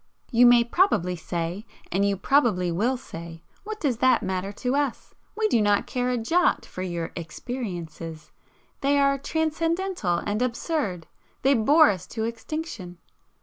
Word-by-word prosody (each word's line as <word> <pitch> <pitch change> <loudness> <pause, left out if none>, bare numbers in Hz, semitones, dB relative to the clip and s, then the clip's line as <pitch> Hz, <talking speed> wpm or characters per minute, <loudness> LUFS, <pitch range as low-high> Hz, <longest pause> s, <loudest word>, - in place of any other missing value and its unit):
You 245 0 +6
may 240 -1 +7
probably 235 - +2
say 170 +3 -4 0.3
and 195 +2 +1
you 200 -1 +1
probably 205 -8 +2
WILL 230 +10 +1
say 165 -5 -9 0.2
"What 430 +1 -6
does 265 -7 0
that 255 -2 +3
matter 190 0 -2
to 250 +5 -1
us? 285 -4 -2 0.2
We 435 -1 +2
do 235 - +2
not 205 -1 +2
care 250 0 -1
a 250 - 0
jot 340 +11 +2
for 185 - -8
your 170 -3 -3
'experiences' 170 -4 -6 0.5
they 280 +1 +2
are 275 0 +3
transcendental 325 - -1
and 205 +5 -2
absurd 240 - -2 0.4
they 270 +2 +5
bore 290 +6 +5
us 185 -2 -6
to 220 - -4
extinction." 230 - -5
230 Hz, 150 wpm, -25 LUFS, 180-280 Hz, 0.5 s, may